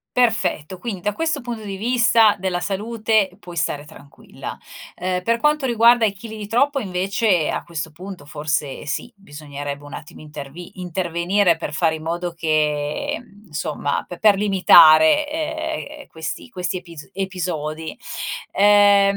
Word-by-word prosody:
Perfetto, 225 -8 +1
quindi 195 -1 -5
da 210 +3 -1
questo 320 +4 -1
punto 235 -3 -6
di 200 -2 -5
vista, 230 -1 +4
della 185 -1 -1
salute, 215 +2 0
puoi 175 -4 -11
stare 150 -3 -1
tranquilla. 140 -1 -10 0.4
Ehm, 180 0 -2
per 230 +5 +1
quanto 300 +2 +2
riguarda 235 -1 +5
i 200 - 0
chili 220 +2 -9
di 205 -1 -7
troppo, 275 +4 +2
invece, 190 -2 +1
a - - -3
questo 160 -2 -6
punto 180 -2 -9
forse 150 -1 -3
sì, 235 +11 -4
bisognerebbe 145 -5 -8
un 145 - -10
attimo 150 - -10
intervi 150 +4 -10
intervenire 175 +1 +1
per 160 - -5
fare 160 +1 +1
in 155 - -10
modo 170 +2 -3
che, 155 - -1 0.3
insomma, 150 -3 -2
p 175 - -8
per 210 -2 +5
limitare, 185 - +6 0.7
ehm, 290 - -12
questi 160 +9 -6
questi 180 -3 -3
epis 170 -4 -12
episodi. 170 -5 -4 0.5
Ehm, 200 0 +5
185 Hz, 145 wpm, -21 LUFS, 160-215 Hz, 0.7 s, limitare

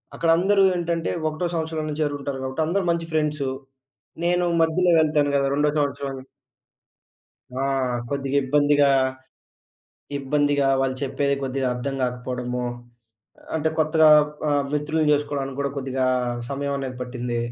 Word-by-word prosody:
అక్కడ 165 - 0
అందరూ 195 +3 +3
ఏంటంటే 170 -1 -1 0.2
ఒకటో 155 +3 -2
సంవత్సరంలోనే 160 -2 -3
చేరుకుంటారు 145 -2 -2
గాబట్టి, 130 +4 -2
అందరూ 195 +3 0
మంచి 165 -1 -2
ఫ్రెండ్సూ, 150 -3 0 0.8
నేను 175 0 +2 0.2
మధ్యలో 175 +2 +3
వెళ్తాను 150 -2 +2
గదా! 140 -1 +2
రెండో 150 +1 +2
సంవత్సరం. 140 -1 -2 1.4
ఆ! - - -2 0.5
కొద్దిగ 140 0 -3
ఇబ్బందిగా, 145 +1 +3 1.3
ఇబ్బందిగా 145 0 +1
వాళ్ళు 130 -1 0
చెప్పేది 140 +1 0
కొద్దిగా 135 0 -1
అర్థం 135 +3 -3
గాకపోవడము, 125 0 -3 0.9
అంటే 160 0 +1
కొత్తగా 155 0 +4 0.4
ఆహ్, 145 -1 +2
మిత్రుల్ని 150 +1 0
జేసుకోవడానికి 145 -2 -1
కూడా 140 0 -1
కొద్దిగా 130 -1 -1 0.4
సమయం 140 0 -2
అనేది 130 -2 -5
పట్టింది. 125 -1 -4
145 Hz, 120 wpm, -23 LUFS, 135-155 Hz, 1.4 s, కొత్తగా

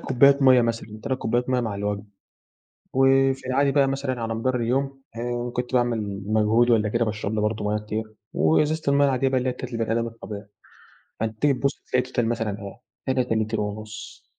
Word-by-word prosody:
كوبايات 140 +2 +4
مَيّة 130 -2 +7
مثلًا، 115 -2 -3
3 130 -1 -2
كوبايات 120 +2 0
مَيّة 125 -1 +2
مع 110 -4 -2
الوجبة. 100 0 -3 0.9
وفي 135 0 +3
العادي 135 +2 +2
بقى 140 -1 +4
مثلًا 135 -3 -2
على 115 0 -2
مدار 125 +3 0
اليوم، 135 +3 -1 0.2
إن 120 +1 -3
كنت 125 +1 -4
باعمل 110 -5 0
مجهود 110 +3 +3
والّا 110 -2 +3
كده 115 +2 +1
باشرب 110 -1 -3
لي 110 - 0
برضه 105 0 -1
مَيَّة 105 +1 +1
كتير 110 +1 -5 0.2
وإزازة 150 - +2
المَيَّة 140 0 +4
العادية 135 0 +2
بقى 130 - +1
اللي 130 +1 -1
هي - - +1
بتاعة 125 0 -7
البني 115 -1 -1
أدم 115 0 0
الطبيعي. 110 -3 -8 0.7
فأنت 110 -1 -3
تيجي 145 -1 +4
تبُص 140 +2 -1
تلاقي 125 0 +2
الtotal - - -1
مثلًا 115 -3 -1 0.5
إيه، 130 - +2
3 125 -3 0
لِتْر 110 0 0
ونُص. 105 0 -7
120 Hz, 190 wpm, -24 LUFS, 110-130 Hz, 0.9 s, مَيّة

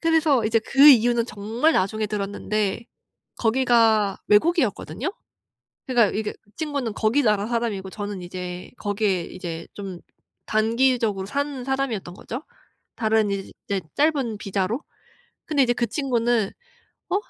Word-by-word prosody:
그래서 320 -7 +3
이제 225 +1 +3
그 270 +6 +5
이유는 240 -3 +5
정말 230 +9 0
나중에 215 +1 0
들었는데 205 +1 -2 0.5
거기가 225 -4 +3
외국이었거든요. 245 - +1 0.8
그러니까 235 -5 +3
이게 215 -1 -2
그 205 - -29
친구는 280 -8 -2
거기 230 +6 +2
나라 210 -2 +2
사람이고 225 -5 -2
저는 205 -1 -5
이제 180 0 -7
거기에 205 -3 0
이제 170 -3 -7
좀 190 -3 -7 0.5
단기적으로 225 -2 +1
산 280 +1 -3
사람이었던 265 -9 -2
거죠. 245 +9 -7 0.5
다른 220 -2 +2
이제 195 0 -4 0.2
짧은 280 -7 +1
비자로. 200 +6 -2 0.6
근데 290 -3 +3
이제 245 -1 +2
그 240 - 0
친구는 240 -5 +1 0.6
어? - - +2
220 Hz, 300 characters per minute, -24 LUFS, 200-255 Hz, 0.8 s, 그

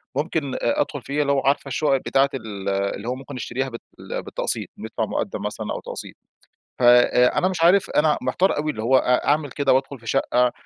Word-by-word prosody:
ممكن 145 -1 -1
أدخل 145 +4 0
فيها، 140 +4 -2
اللي 140 -1 +1
هو 140 - +2
عارفة 140 +1 +1
الشقق 140 0 +1
بتاعة 135 +1 +2
ال 105 -5 -5
اللي 100 +2 -2
هو 125 - -1
ممكن 135 +1 -9
نشتريها 130 +1 -3
بال 115 -2 -8
بالتقسيط - - -3
ندفع - - -3
مقدم - - -3
مثلًا - - -4
أو - - -4
تقسيط. - - -8 0.6
فأنا 125 +5 +5
مش 185 -3 -3
عارف 185 +3 +4
أنا 150 0 +2
محتار 190 +2 +1
أوي 150 +1 -1
اللي 110 - -6
هو 130 +3 +4
أ 125 -1 +1
أعمل 145 -1 +1
كده 140 -1 +2
وأدخل 135 +1 -1
في 115 - -15
شقة؟ 125 -1 +2
135 Hz, 190 wpm, -23 LUFS, 125-145 Hz, 0.6 s, فأنا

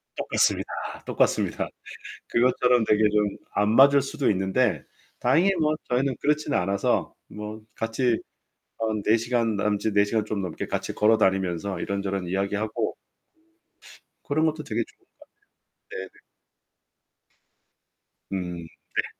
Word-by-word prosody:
똑같습니다, - - +1 0.4
똑같습니다. - - +1 0.6
그것처럼 125 -1 +3
되게 110 0 +3
좀 105 0 +2 0.3
안 105 +1 +2
맞을 140 +2 +7
수도 140 -2 0
있는데 95 0 +1 0.4
다행히 165 +11 +4
뭐 155 0 +2
저희는 130 +1 +1
그렇진 150 -1 +1
않아서 100 +2 +1 0.2
뭐 105 +1 -7
같이 115 +1 0 0.6
한 110 -2 -1
4 110 - +5
시간 115 -1 0
남짓 105 +1 0
4 100 0 +5
시간 105 +1 0
좀 105 -2 -2
넘게 90 -4 -4
같이 - - -3
걸어 110 +1 +4
다니면서 95 -1 0
이런저런 100 -2 -2
이야기하고 100 +4 -1 1.3
그런 155 +3 +1
것도 155 -1 -1
되게 115 +1 -1
좋은 - - -24
거 - - -32 0.8
같아요. - - -6
네네. - - -25 2.1
음. 90 -3 -4 0.3
네. - - +1
110 Hz, 265 characters per minute, -25 LUFS, 100-125 Hz, 2.1 s, 맞을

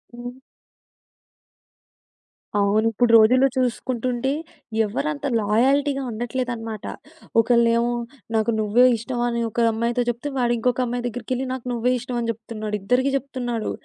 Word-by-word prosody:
హ్మ్. 245 +1 -8 2.2
అవును. 205 +2 +2
ఇప్పుడు 235 +2 +2
రోజుల్లో 255 +5 +5
చూసుకుంటుంటే 255 0 -1 0.5
ఎవరు 150 -8 -2
అంత 140 - -7
లాయల్టీగా 270 +6 +2
ఉండట్లేదన్నమాట. 230 -2 -4 0.5
ఒకళ్ళేమో 235 0 +3 0.4
నాకు 220 +1 +2
నువ్వే 215 +4 +4
ఇష్టం 240 +2 -4
అని 235 0 -1
ఒక 235 +2 +1
అమ్మాయితో 235 +2 0
చెప్తే, 240 +5 -3
వాడింకొక 240 +1 +1
అమ్మాయి 245 0 -3
దగ్గరికెళ్ళి 250 +2 -3
నాకు 255 -1 -6
నువ్వే 245 +2 +1
ఇష్టం 250 0 -4
అని 230 0 0
చెప్తున్నాడు. 215 -1 -5
ఇద్దరికి 255 +6 +1
చెప్తున్నాడు. 245 -4 -4
240 Hz, 115 wpm, -23 LUFS, 225-250 Hz, 2.2 s, రోజుల్లో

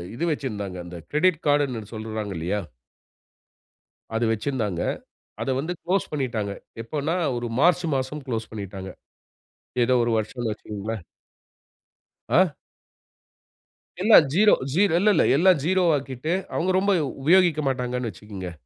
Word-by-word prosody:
இது 165 - -4
வச்சிருந்தாங்க. 105 -10 -4
அந்த 90 0 -8
கிரெடிட் 165 +2 +3
கார்ட்ன்னு 135 -7 +1
சொல்றாங்க 110 -2 -4
இல்லையா? 95 +6 -1 1.5
அது 115 - +1
வச்சிருந்தாங்க. 110 -6 -2 0.6
அதை 135 - 0
வந்து 160 +5 -3
குளோஸ் 190 +3 0
பண்ணிட்டாங்க. 120 -8 -2 0.3
எப்பன்னா, 150 +7 -2 0.2
ஒரு 120 0 -3
மார்ச் 175 +2 +4
மாசம் 135 +2 -4
குளோஸ் 115 -2 -3
பண்ணிட்டாங்க. 95 -3 -6 0.9
ஏதோ 125 +2 +2
ஒரு 120 - 0
வருஷம்னு 110 +1 -2
வச்சுக்கோங்களேன். 105 -2 -5 1.3
ஆ. 180 -2 +4 1.5
எல்லாம் 210 -6 +8
0 210 +5 +6 0.2
ஜீ 175 - +1 0.2
இல்ல 210 +3 +4
இல்ல - - +4
எல்லாம் 180 -2 +5
0 185 +1 +3
ஆக்கிட்டு 135 +3 -3 0.2
அவங்க 185 +2 +1
ரொம்ப 200 +1 +2 0.3
உபயோகிக்க 170 -2 +4
மாட்டாங்கன்னு 125 -2 -2
வச்சுக்குங்க. 95 -2 -8
130 Hz, 120 wpm, -24 LUFS, 110-160 Hz, 1.5 s, எல்லாம்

